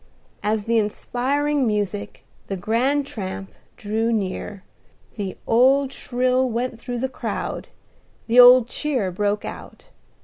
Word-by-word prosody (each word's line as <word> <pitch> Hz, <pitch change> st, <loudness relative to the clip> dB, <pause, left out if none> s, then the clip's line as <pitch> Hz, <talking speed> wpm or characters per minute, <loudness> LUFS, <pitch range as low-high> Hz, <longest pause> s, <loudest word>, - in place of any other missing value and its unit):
As 210 Hz, 0 st, 0 dB
the 230 Hz, +1 st, +2 dB
inspiring 265 Hz, +6 st, 0 dB
music, 205 Hz, -1 st, -3 dB, 0.2 s
the 195 Hz, -, -3 dB
grand 255 Hz, +9 st, +1 dB
tramp, 195 Hz, -5 st, -6 dB, 0.3 s
drew 220 Hz, +2 st, -1 dB
near, 200 Hz, -1 st, -3 dB, 0.5 s
the 195 Hz, -4 st, -5 dB
old 265 Hz, +3 st, +3 dB
thrill 255 Hz, +1 st, 0 dB
went 235 Hz, 0 st, -3 dB
through 245 Hz, 0 st, -4 dB
the 260 Hz, +3 st, -1 dB
crowd, 260 Hz, -, -5 dB, 0.6 s
the 240 Hz, +2 st, +4 dB
old 245 Hz, -1 st, +9 dB
cheer 255 Hz, -8 st, -2 dB
broke 205 Hz, +3 st, -1 dB
out. -, -, -10 dB
230 Hz, 125 wpm, -22 LUFS, 205-255 Hz, 0.6 s, old